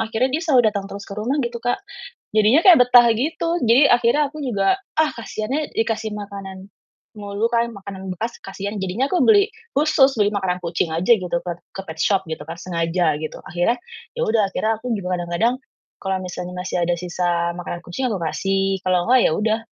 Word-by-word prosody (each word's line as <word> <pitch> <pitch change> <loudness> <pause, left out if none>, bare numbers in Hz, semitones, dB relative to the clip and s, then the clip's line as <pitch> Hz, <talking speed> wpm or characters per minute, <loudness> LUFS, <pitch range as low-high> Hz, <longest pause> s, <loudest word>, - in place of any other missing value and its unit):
akhirnya 225 +3 0
dia 320 - 0
selalu 280 -7 +4
datang 200 -2 -4
terus 200 0 -7
ke 200 - -7
rumah 235 +7 -1
gitu 240 -1 -3
Kak 245 - +1 0.6
jadinya 220 +7 +5
kayak 360 -3 +9
betah 245 -1 +7
gitu, 320 +7 -1
jadi 245 +5 +6
akhirnya 245 +5 +3
aku 310 - -10
juga 210 - +1 0.2
ah 315 -1 +4
kasian, 215 -1 -5
ya 305 0 0
dikasih 225 -1 -1
makanan 195 -2 -8 0.5
mulu 205 +2 -2
kan, 235 0 +1
makanan 190 -1 -7
bekas 230 +6 -4
kasian 200 +2 -5
jadinya 200 +9 -1
aku 365 - +1
beli 410 -1 +5 0.3
khusus 290 -2 +4
beli 205 -1 +4
makanan 190 -3 -1
kucing 170 0 -1
aja 180 +8 +3
gitu 180 -3 -2
ke 175 - -3 0.2
ke 195 - -4
petshop 175 +5 +1
gitu 160 - -5
kan 165 +1 -7
sengaja 170 -2 0
gitu, 155 - -5
akhirnya 175 +9 +1 0.4
ya 475 - -1
udah 220 0 +3
akhirnya 220 0 0
aku 245 +1 -3
juga 180 -2 -2
kadang-kadang 175 +8 0 0.5
kalau 190 -1 -1
misalnya 180 0 -6
masih 180 -1 -2
ada 175 - 0
sisa 175 -1 -1
makanan 175 0 -5
kucing 255 +10 -3
aku 200 - -2
kasih 195 +4 0
kalau 180 -1 +2
nggak 255 0 +6
ya - - +1
udah, 220 +3 +1
205 Hz, 190 wpm, -21 LUFS, 180-240 Hz, 0.6 s, kayak